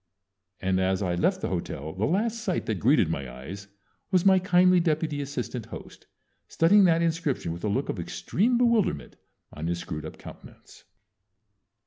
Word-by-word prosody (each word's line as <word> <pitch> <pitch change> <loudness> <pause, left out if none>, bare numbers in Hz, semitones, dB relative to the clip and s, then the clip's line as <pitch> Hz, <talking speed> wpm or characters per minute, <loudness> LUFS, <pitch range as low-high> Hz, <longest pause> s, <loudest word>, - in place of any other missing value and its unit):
And 95 0 0
as 95 +1 0
I 90 -2 0
left 85 - +1
the - - -2
hotel 75 +3 -4
the 95 +4 -1
last 220 +7 0
sight 185 -6 -1
that 110 -4 -2
greeted 125 - +4
my 70 -6 -4
eyes 90 +11 -9 0.4
was 185 -2 +2
my 190 -1 +6
kindly 180 0 +4
deputy 155 -3 0
assistant 125 -4 -5
host - - -11 0.4
studying 195 +5 +4
that 165 -1 +3
inscription 160 - -1
with 85 - -9
a - - 0
look 100 - -1
of - - -4
extreme 235 +6 0
bewilderment 235 - +1 0.4
on 80 +2 -5
his 85 0 -1
screwed 80 -2 -6
up - - -11
countenance. - - -14
140 Hz, 165 wpm, -26 LUFS, -, 0.4 s, my